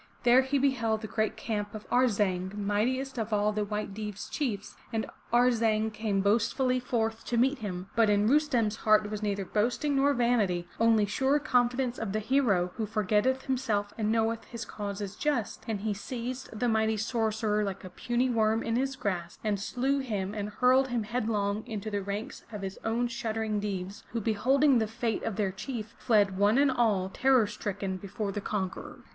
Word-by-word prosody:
There 245 +1 +6
he 265 +2 0
beheld 235 -5 +1
the 220 - -5
great 215 0 -1
camp 210 -2 -3
of 215 - -8
Ar' 250 +1 +5
zang, 190 -3 -1
mightiest 240 +6 -1
of 220 0 -3
all 210 0 +2
the 210 0 0
White 210 -1 -3
Deev*s 210 -1 -6
chiefs, 220 -9 -3 0.2
and 225 -2 -1 0.3
Arzang 225 -3 +3
came 210 -2 0
boastfully 235 +5 +2
forth 225 -2 -1
to 240 - -1
meet 265 +4 +3
him. 185 -4 -5
But 225 -2 +4
in 205 0 +3
Rustem's 245 -6 +2
heart 215 -1 +3
was 210 -1 -4
neither 200 -2 -1
boasting 240 +9 0
nor 280 +1 +3
vanity 210 -8 +1
— - - -24
only 225 -2 +4
sure 265 +7 +2
confidence 250 -3 +1
of 215 -3 -3
the 215 - +1
hero, 210 -7 +2
who 220 -2 -2
forgetteth 215 +5 +1
himself 225 -6 -1
and 215 -1 0
knoweth 225 0 0
his 235 -1 -7
cause 200 -1 -5
is 200 0 -5
just, 280 -6 -1
and 215 -3 -2
he 215 0 -1
seized 250 +5 -5
the 245 - +1
mighty 220 -1 +2
sorcerer 220 -1 0
like 195 -2 -4
a 185 - -7
puny 245 +1 0
worm 225 -2 +2
in 230 0 0
his 270 +1 -1
grasp 175 -7 -3
and 210 -2 0
slew 260 +7 0
him 205 -7 -3
and 210 -1 -3
hurled 255 +4 +3
him 240 -3 -1
headlong 215 -2 -1
into 215 -2 -4
the 205 -1 -1
ranks 200 +3 -5
of 210 -2 -6
his 190 0 -5
own 235 +2 0
shuddering 220 -2 -2
Deevs, 195 -1 -4
who 230 - 0
beholding 255 +5 +3
the 220 - 0
fate 225 0 -2
of 225 - -3
their 200 -2 0
chief, 220 +2 -6
fled, 205 -5 +2
one 205 +4 +4
and 280 -1 +4
all, 220 -7 +2
terror 260 +2 +3
stricken 200 -2 -4
before 200 +2 -4
the 205 - -4
conqueror. 190 -3 -4
220 Hz, 190 wpm, -29 LUFS, 205-245 Hz, 0.3 s, There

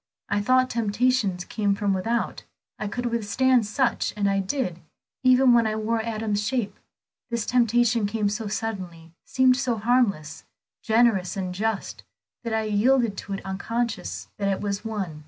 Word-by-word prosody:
I 205 0 +1
thought 255 +4 +3
temptations 220 -4 0
came 205 -2 0
from 200 -1 0
without; 225 +5 -1 0.4
I 210 - -3
could 245 +4 -4
withstand 235 +1 +2
such, 250 +2 0
and 205 -1 +1
I 195 0 +1
did, 195 -3 -2 0.4
even 255 -1 +5
when 235 -2 +4
it 215 0 -1
wore 225 +1 0
Adam's 220 -2 -2
shape. 210 -1 -2 0.5
This 235 -2 -2
temptation 240 -2 +2
came 210 0 -1
so 210 +2 -3
suddenly, 185 -6 -5
seemed 255 -1 +3
so 255 -4 -1
harmless, 210 -9 0 0.4
generous 220 -4 +2
and 185 -2 -3
just, 215 +2 -3 0.4
that 230 - -4
I 220 0 0
yielded 220 +1 +2
to 200 - -6
it 195 - -6
unconscious 230 +4 -3
that 200 - 0
it 195 -1 0
was 200 -1 -3
one. 200 -9 -4
220 Hz, 155 wpm, -25 LUFS, 200-240 Hz, 0.5 s, even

